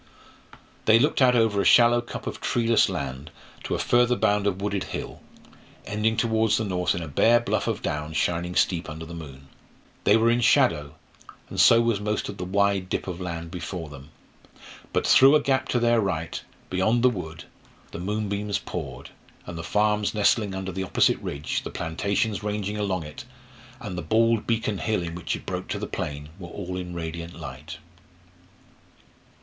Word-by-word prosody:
They 110 Hz, +1 st, +7 dB
looked 145 Hz, +4 st, +2 dB
out 125 Hz, -1 st, +5 dB
over 110 Hz, -4 st, +3 dB
a -, -, 0 dB
shallow 120 Hz, 0 st, +6 dB
cup 120 Hz, -, -8 dB
of -, -, -5 dB
treeless 115 Hz, -1 st, +2 dB
land 70 Hz, +1 st, -5 dB, 0.3 s
to -, -, -2 dB
a -, -, -1 dB
further 120 Hz, 0 st, +3 dB
bound 105 Hz, -3 st, +1 dB
of 95 Hz, -2 st, -1 dB
wooded 100 Hz, -1 st, -2 dB
hill, -, -, -6 dB, 0.6 s
ending 105 Hz, +2 st, 0 dB
towards 110 Hz, -1 st, +2 dB
the 110 Hz, -, -1 dB
north 90 Hz, -2 st, 0 dB
in 85 Hz, -, -3 dB
a -, -, -6 dB
bare 115 Hz, +11 st, +4 dB
bluff 120 Hz, -, -1 dB
of -, -, -2 dB
down 75 Hz, +1 st, -3 dB
shining 85 Hz, +2 st, -1 dB
steep 85 Hz, -3 st, +1 dB
under 80 Hz, +1 st, -7 dB
the 85 Hz, -, -9 dB
moon. 70 Hz, -5 st, -10 dB, 0.6 s
They 105 Hz, -, +5 dB
were 115 Hz, +1 st, +3 dB
in 120 Hz, +1 st, +2 dB
shadow, 75 Hz, -9 st, +3 dB, 0.6 s
and -, -, -4 dB
so 115 Hz, 0 st, +7 dB
was 115 Hz, -3 st, +1 dB
most 105 Hz, 0 st, -2 dB
of -, -, -7 dB
the 90 Hz, -, -3 dB
wide 100 Hz, 0 st, +1 dB
dip -, -, -2 dB
of 90 Hz, -1 st, -5 dB
land 85 Hz, -2 st, -5 dB
before 85 Hz, -2 st, -5 dB
them; 70 Hz, 0 st, -12 dB, 0.8 s
but -, -, 0 dB
through 135 Hz, +3 st, +7 dB
a -, -, +6 dB
gap 135 Hz, -2 st, 0 dB
to 120 Hz, -, +2 dB
their 120 Hz, -1 st, +3 dB
right, 85 Hz, -5 st, -2 dB, 0.3 s
beyond 110 Hz, +6 st, +2 dB
the 125 Hz, -, +7 dB
wood, 90 Hz, -5 st, -7 dB, 0.5 s
the -, -, -7 dB
moonbeams 100 Hz, +1 st, -2 dB
poured, 65 Hz, -8 st, -7 dB, 0.3 s
and 90 Hz, -, -7 dB
the 80 Hz, -, -6 dB
farms 105 Hz, +3 st, +1 dB
nestling 105 Hz, -1 st, +2 dB
under 95 Hz, 0 st, -4 dB
the 95 Hz, +2 st, -4 dB
opposite 95 Hz, -, +2 dB
ridge, 70 Hz, +1 st, -3 dB
the -, -, -6 dB
plantations 100 Hz, +5 st, -1 dB
ranging 105 Hz, 0 st, -3 dB
along 95 Hz, -4 st, -1 dB
it, 75 Hz, 0 st, -9 dB, 0.6 s
and 105 Hz, -8 st, -6 dB
the 90 Hz, -, -3 dB
bald 115 Hz, +5 st, +2 dB
beacon 110 Hz, -3 st, 0 dB
hill 110 Hz, -5 st, 0 dB
in 85 Hz, -1 st, -5 dB
which 85 Hz, -1 st, -3 dB
it -, -, -10 dB
broke -, -, -4 dB
to -, -, -3 dB
the -, -, -4 dB
plain, 75 Hz, 0 st, -5 dB
were 85 Hz, -2 st, -8 dB
all 90 Hz, 0 st, -6 dB
in 90 Hz, -1 st, -5 dB
radiant 85 Hz, 0 st, -6 dB
light. 75 Hz, +2 st, -8 dB
95 Hz, 185 wpm, -25 LUFS, 85-110 Hz, 0.8 s, They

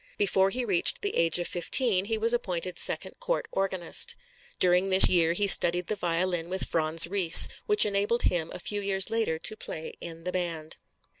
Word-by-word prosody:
Before 195 Hz, -1 st, 0 dB
he 245 Hz, +4 st, -5 dB
reached 190 Hz, -, +2 dB
the 405 Hz, -, -5 dB
age 165 Hz, 0 st, +1 dB
of 175 Hz, -, -3 dB
fifteen 190 Hz, +2 st, -1 dB
he 225 Hz, +1 st, -4 dB
was 230 Hz, +2 st, -1 dB
appointed 180 Hz, -6 st, -5 dB
second -, -, -2 dB
court -, -, -4 dB
organist. 190 Hz, -3 st, -3 dB, 0.4 s
During 180 Hz, +1 st, 0 dB
this 190 Hz, 0 st, +6 dB
year 170 Hz, -2 st, +1 dB
he 205 Hz, +4 st, -2 dB
studied 175 Hz, -2 st, +5 dB
the 215 Hz, -, -5 dB
violin 175 Hz, -2 st, -4 dB
with 190 Hz, +1 st, -1 dB
Franz 160 Hz, 0 st, +3 dB
Ries, 180 Hz, -3 st, +6 dB, 0.2 s
which 420 Hz, -1 st, +7 dB
enabled 205 Hz, +3 st, -2 dB
him 165 Hz, -2 st, -2 dB
a -, -, -9 dB
few 205 Hz, +3 st, -4 dB
years 195 Hz, +1 st, -1 dB
later 225 Hz, -8 st, -3 dB
to 165 Hz, +6 st, 0 dB
play 160 Hz, -6 st, -9 dB
in 165 Hz, -1 st, -11 dB
the 180 Hz, -, -6 dB
band. 165 Hz, -4 st, -6 dB
185 Hz, 190 wpm, -25 LUFS, 170-205 Hz, 0.4 s, which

